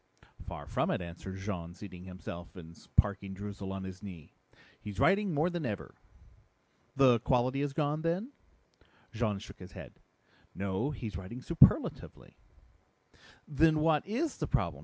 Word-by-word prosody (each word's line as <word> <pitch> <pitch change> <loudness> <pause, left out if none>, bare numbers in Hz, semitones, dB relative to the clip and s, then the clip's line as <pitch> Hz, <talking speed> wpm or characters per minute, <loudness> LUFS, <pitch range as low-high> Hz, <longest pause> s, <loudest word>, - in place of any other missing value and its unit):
"Far - - -6
from - - 0
it," - - +1
answered 90 +2 -7
Jean, 90 -4 -4
seating 90 -3 -9
himself 85 -2 -8
and 85 -2 -10 0.2
parking 100 -1 +2
Droozle 100 -1 -5
on 95 0 -4
his 95 0 -7
knee. 90 -7 -9 0.5
"He's 100 -2 -6
writing 195 - +4
more 160 +4 +2
than 175 -2 -2
ever." 105 -7 -4 1.0
"The 130 -4 +6
quality 130 +3 +2
is 145 -1 0
gone, 150 +1 0
then?" 175 - -1 0.8
Jean 110 -3 0
shook 100 - -10
his 90 -1 -10
head. - - -10 0.6
"No, 100 +7 -1
he's 110 -9 -4
writing 95 +7 -7
superlatively." 170 - +4 1.1
"Then 155 +2 +4
what 155 -1 +3
is 275 +10 -1
the - - -2
problem?" - - 0
105 Hz, 145 wpm, -32 LUFS, 95-150 Hz, 1.1 s, The